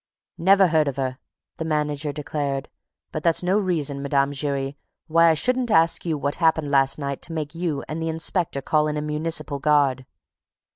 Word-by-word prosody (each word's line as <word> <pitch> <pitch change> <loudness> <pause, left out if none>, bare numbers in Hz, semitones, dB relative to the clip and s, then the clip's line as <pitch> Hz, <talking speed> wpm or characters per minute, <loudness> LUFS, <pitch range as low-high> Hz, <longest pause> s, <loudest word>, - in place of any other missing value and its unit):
"Never 195 +1 +5
heard 155 -2 +3
of 140 - -2
her!" 130 -1 -3 0.4
the - - -3
manager 150 -1 -1
declared. 145 -2 -3 0.4
"But - - -4
that's 170 +1 +2
no 185 +4 +2
reason, 155 -8 -1
Mme. 140 0 +1
Giry, 140 -1 -2 0.3
why 165 +1 +4
I 160 - +4
shouldn't 250 +7 +1
ask 165 -2 +3
you 160 -2 0
what 140 0 -2
happened 160 -3 +2
last 135 -1 +3
night 140 -2 -4
to 170 - -5
make 150 -2 -4
you 165 -4 -2
and 155 +1 -4
the 165 - -1
inspector 160 -2 -1
call 155 -1 +2
in 150 0 -2
a - - -1
municipal 150 -1 -2
guard." 140 -3 +2
150 Hz, 185 wpm, -23 LUFS, 140-165 Hz, 0.4 s, Never